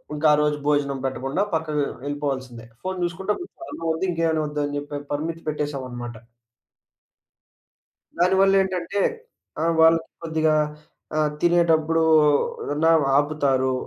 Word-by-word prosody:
ఇంకా 155 +1 +2
ఆ - - +6
రోజు 150 0 +1
భోజనం 140 -2 +1
పెట్టకుండా 135 +7 -1
పక్కకు 155 -3 -1 0.2
ఎళ్ళిపోవాల్సిందే. 130 -5 -4 0.2
ఫోను 185 0 -3
జూసుకుంటే 190 +4 -2 0.4
అన్నం 165 - -7
ఒద్దు 175 +4 -2
ఇంకేమైనా 165 -2 0
ఒద్దు 150 0 -3
అని 145 0 -4
జెప్పి 145 0 -5
పరిమితి 165 +3 -3
పెట్టేసామన్నమాట... 130 -6 -4 2.0
దానివల్లేంటంటే, 190 0 +2 0.6
ఆ! - - 0 0.2
వాళ్ళకి 165 0 +5
కొద్దిగా 160 -1 +1 0.6
ఆహ్, 155 -1 +2
తినేటప్పుడు, 165 -2 +3 0.6
ఎవరనా 150 +3 +1 0.3
ఆపుతారు. 140 -3 +1
155 Hz, 110 wpm, -23 LUFS, 145-165 Hz, 2.0 s, ఆ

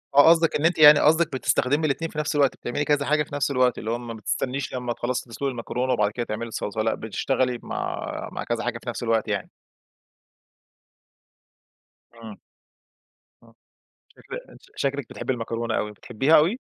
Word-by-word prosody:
آه، 145 +3 +8
قصدِك 165 -1 +4
إن 150 - 0
أنتِ 170 0 +3
يعني 150 -1 +9
قصدِك 160 0 +3
بتستخدمي 130 +4 +1
الاتنين 160 +3 -1
في - - -11
نفس 150 0 -1
الوقت، 140 -2 +3
بتعملي 135 +5 -3
كذا 145 -1 +1
حاجة 150 +1 +2
في 145 - -9
نفس 145 0 0
الوقت، 125 -2 +2
اللي 110 +1 -4
هو 120 - 0
ما 120 -1 -7
بتستنيش 125 +4 -3
لمَّا 125 -2 -2
تخلَّصي 120 +1 -3
تسلُقي 135 +4 -3
المكرونة، 125 +1 -2
وبعد 105 -3 +1
كده 120 +2 -3
تعملي 115 +2 -4
الصلصلة، 110 -1 -3
لأ 110 - +1
بتشتغلي 125 +3 -1
مع - - -4
مع - - -5
كذا 120 -1 -2
حاجة 120 -1 -2
في 125 - -5
نفس 120 +1 -5
الوقت 115 -1 +1
يعني؟ 100 -2 -2 2.6
آه. 115 -3 -11 1.0
آه، - - -20 0.6
شكل - - -8 0.4
شكلِك 140 -2 -2
بتحبي 130 - -3
المكرونة 115 -1 -3
أوي، 105 - -2
بتحبيها 125 +8 +1
أوي؟ 170 +10 +3
125 Hz, 170 wpm, -24 LUFS, 115-145 Hz, 2.6 s, يعني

